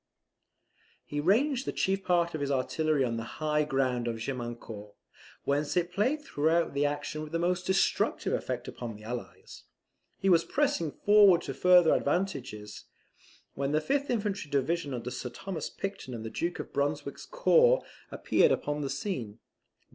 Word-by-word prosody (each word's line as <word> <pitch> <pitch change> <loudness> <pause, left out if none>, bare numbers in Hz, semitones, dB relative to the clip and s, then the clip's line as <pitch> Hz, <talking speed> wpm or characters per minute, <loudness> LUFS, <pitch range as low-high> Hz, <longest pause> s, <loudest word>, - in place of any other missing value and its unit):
He 145 - -4
ranged 250 - +2
the - - 0
chief 195 0 0
part 170 -2 +2
of 155 - -4
his 140 - -1
artillery 145 +2 +1
on 115 -2 -1
the 115 - -3
high 150 -1 +1
ground 130 -4 0
of 115 - -1
Gemiancourt, 115 -4 -6 0.5
whence 145 +3 0
it 175 0 +1
played 255 +11 0
throughout 165 - +1
the 145 +1 +2
action 145 +1 -4
with 155 +1 -6
most 180 +1 0
destructive 190 0 +1
effect - - -3
upon 115 -3 -6
the 105 - -13
Allies. 120 +2 -8 0.5
He 195 - -2
was 175 -3 +5
pressing 280 - 0
forward 205 -3 +5
to - - -4
further 180 -3 +5
advantages, 135 - -2 0.7
when 140 +1 -2
the 155 - +4
fifth 280 - -1
infantry 205 -8 -2
division 140 0 0
under 125 +1 -5
Sir 125 - -5
Thomas 185 +7 -5
Picton 195 -10 -6
and 115 -1 -7
the 110 - -5
Duke 175 +1 -2
of - - -7
Brunswick's 145 0 -2
corps - - +4 0.2
appeared - - +2
upon 145 0 -1
the 140 - -2
scene. 135 - -4
155 Hz, 160 wpm, -29 LUFS, 135-190 Hz, 0.7 s, was